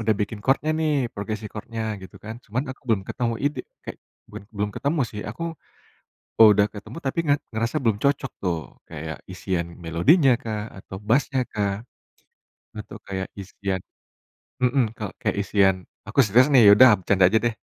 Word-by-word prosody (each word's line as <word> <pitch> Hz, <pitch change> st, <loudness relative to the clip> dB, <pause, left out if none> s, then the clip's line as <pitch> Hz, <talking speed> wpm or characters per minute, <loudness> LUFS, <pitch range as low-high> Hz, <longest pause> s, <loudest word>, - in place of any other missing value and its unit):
udah 110 Hz, -1 st, +2 dB
bikin 105 Hz, +1 st, -2 dB
chordnya 140 Hz, +3 st, +2 dB
nih, 155 Hz, -1 st, +1 dB, 0.2 s
progresi 110 Hz, +1 st, -4 dB
record-nya 110 Hz, +1 st, -6 dB, 0.2 s
gitu 95 Hz, -, -12 dB
kan, 110 Hz, +1 st, -6 dB
cuman 125 Hz, +6 st, -2 dB
aku 130 Hz, -, -10 dB
belum 110 Hz, -4 st, +3 dB
ketemu 120 Hz, -2 st, -1 dB
ide 145 Hz, +1 st, 0 dB, 0.3 s
eee, -, -, -5 dB, 0.3 s
bukan -, -, -9 dB
belum 105 Hz, +1 st, -1 dB
ketemu 145 Hz, +2 st, -1 dB
sih 105 Hz, -, -6 dB
aku 145 Hz, +10 st, -8 dB, 1.0 s
udah 105 Hz, -2 st, +7 dB
ketemu 105 Hz, +9 st, -9 dB
tapi 135 Hz, +5 st, -1 dB
nga 145 Hz, -1 st, +4 dB, 0.2 s
ngerasa 115 Hz, +1 st, -1 dB
belum 110 Hz, -4 st, +3 dB
cocok 140 Hz, -2 st, +1 dB
tuh, 85 Hz, -3 st, 0 dB, 0.3 s
kayak 80 Hz, -1 st, -6 dB
isian 90 Hz, -2 st, -2 dB, 0.2 s
melodinya 130 Hz, -, +4 dB
kah, 110 Hz, -2 st, -3 dB, 0.2 s
atau 95 Hz, 0 st, -9 dB
bass-nya 135 Hz, +2 st, +2 dB
kah, 100 Hz, -2 st, 0 dB, 1.0 s
atau -, -, -8 dB
kayak 95 Hz, -1 st, -3 dB
isian 95 Hz, -1 st, -4 dB, 0.8 s
mhm, 125 Hz, +2 st, +3 dB, 0.4 s
kayak 110 Hz, -3 st, 0 dB
isian 95 Hz, -2 st, +3 dB, 0.3 s
aku 105 Hz, -, -7 dB
serius 115 Hz, +5 st, +5 dB
nih, 125 Hz, -, +8 dB
ya -, -, +10 dB
udah 130 Hz, -, +10 dB
bercanda 95 Hz, 0 st, +4 dB
aja 110 Hz, +4 st, +3 dB
deh. 120 Hz, -1 st, +1 dB
110 Hz, 165 wpm, -24 LUFS, 100-130 Hz, 1.0 s, ya